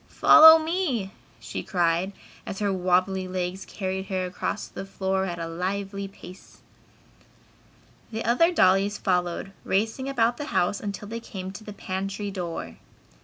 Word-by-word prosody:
"Follow 320 +1 +9
me!" 315 - -1 0.3
she - - -5
cried 175 +1 0 0.4
as - - -5
her 205 -1 0
wobbly 185 +1 +1
legs 185 +1 -3
carried 190 -1 -4
her 185 -2 -1
across 190 +3 -4
the - - -7
floor 190 0 -1
at 175 -2 -4
a 165 - -4
lively 195 +3 -3
pace. 185 -1 -14 1.5
The 225 0 -4
other 290 +10 +4
dollies 195 - +3
followed, 180 0 -1
racing 225 +7 -1
about 240 -3 +1
the 295 - -4
house 200 -7 0
until 205 0 -6
they 230 +2 -5
came 190 -4 -7
to 205 +3 -10
the 210 - -8
pantry 195 +1 -4
door. 175 -4 -5
195 Hz, 145 wpm, -25 LUFS, 185-215 Hz, 1.5 s, Follow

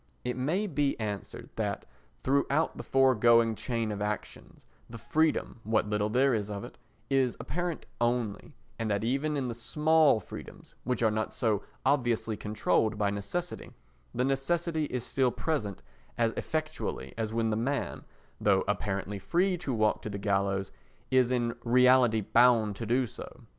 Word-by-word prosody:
It 125 - -1
may 155 +11 0
be 145 - 0
answered 105 -2 -5
that - - -2 0.4
throughout 140 +3 +1
the - - -6
foregoing 120 -3 +4
chain 115 -1 -2
of 105 -1 -4
actions, 105 0 -5 0.2
the 115 - -8
freedom, 155 -1 0
what 110 0 +1
little 105 0 0
there 130 +4 +3
is 105 -2 -1
of 100 -1 -5
it, - - -11 0.3
is 130 -3 +2
apparent 175 +2 -3 0.2
only, 120 -3 -1 0.2
and 115 -1 -1
that 100 0 0
even 140 +5 0
in 130 -2 -1
the 120 - -3
small 150 +3 +3
freedoms, 100 - -11
which 125 -1 0
are 110 - +4
not 110 0 -2
so 110 -4 +1 0.2
obviously 120 -5 +1
controlled 105 +1 0
by 105 -1 +1
necessity, 100 - -4 0.4
the 125 - +1
necessity 155 +4 0
is 125 -4 -3
still 130 0 +1
present 120 - -3 0.3
as 115 -1 +2
effectually 155 0 -3
as 110 -1 -2
when 115 0 0
the - - +1
man, 135 +6 -2 0.4
though 100 -2 +3
apparently 100 -1 -2
free 180 - +1
to 155 -6 -3
walk 110 -3 +1
to - - -5
the 100 - -4
gallows, 100 -1 0 0.4
is 130 -2 +4
in 120 -2 0
reality 125 -2 +5
bound 115 -1 +4
to 115 - -5
do 125 +3 +2
so. 115 - -10
120 Hz, 160 wpm, -29 LUFS, 105-135 Hz, 0.4 s, reality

